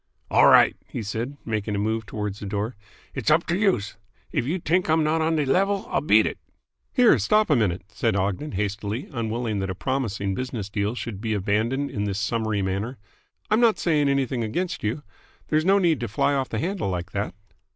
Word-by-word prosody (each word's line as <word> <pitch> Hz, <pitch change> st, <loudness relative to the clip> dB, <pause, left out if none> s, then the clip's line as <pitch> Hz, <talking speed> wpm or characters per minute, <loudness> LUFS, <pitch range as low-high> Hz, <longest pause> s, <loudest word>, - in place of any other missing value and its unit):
"All -, -, +6 dB
right," -, -, +6 dB
he 115 Hz, -, -5 dB
said, 115 Hz, +7 st, -4 dB
making 105 Hz, -2 st, -2 dB
a -, -, -1 dB
move 110 Hz, +1 st, -1 dB
towards 105 Hz, -1 st, -4 dB
the 100 Hz, -, -6 dB
door. 105 Hz, +4 st, -2 dB, 0.4 s
"It's -, -, -1 dB
up 155 Hz, +3 st, +4 dB
to 170 Hz, -, 0 dB
youse. 185 Hz, -, +1 dB, 0.3 s
If -, -, 0 dB
you 170 Hz, +6 st, 0 dB
t'ink 175 Hz, +1 st, 0 dB
I'm 160 Hz, 0 st, +3 dB
not 155 Hz, +1 st, +1 dB
on 160 Hz, +1 st, +1 dB
de 150 Hz, -2 st, +1 dB
level, 195 Hz, +7 st, +1 dB
I'll -, -, +1 dB
beat -, -, +5 dB
it." -, -, -3 dB, 0.5 s
"Here, 250 Hz, -4 st, +5 dB
stop 215 Hz, -4 st, +3 dB
a -, -, +6 dB
minute," 95 Hz, -7 st, 0 dB
said 110 Hz, 0 st, 0 dB
Ogden 100 Hz, +9 st, -1 dB
hastily, 105 Hz, +4 st, -3 dB
unwilling 115 Hz, -2 st, -2 dB
that 95 Hz, 0 st, -2 dB
a 95 Hz, -, -3 dB
promising 105 Hz, -5 st, -2 dB
business 115 Hz, -3 st, -4 dB
deal 105 Hz, +2 st, -1 dB
should 115 Hz, -5 st, -5 dB
be 110 Hz, -1 st, -1 dB
abandoned 110 Hz, +8 st, 0 dB
in 105 Hz, -1 st, -2 dB
this 100 Hz, -1 st, -2 dB
summary 110 Hz, -2 st, -1 dB
manner. 100 Hz, +7 st, -2 dB, 0.5 s
"I'm 215 Hz, -, +4 dB
not 230 Hz, -2 st, +4 dB
saying 150 Hz, -4 st, +2 dB
anything 135 Hz, -3 st, 0 dB
against 170 Hz, +11 st, -3 dB
you. 115 Hz, +8 st, -2 dB, 0.5 s
There's 155 Hz, +1 st, +2 dB
no 195 Hz, +2 st, +5 dB
need 170 Hz, -7 st, +2 dB
to 120 Hz, -, -3 dB
fly 115 Hz, +6 st, +1 dB
off 135 Hz, -2 st, -1 dB
the 110 Hz, -, -3 dB
handle 180 Hz, -, -2 dB
like 90 Hz, 0 st, -4 dB
that." 100 Hz, -2 st, -3 dB
115 Hz, 205 wpm, -24 LUFS, 105-155 Hz, 0.5 s, All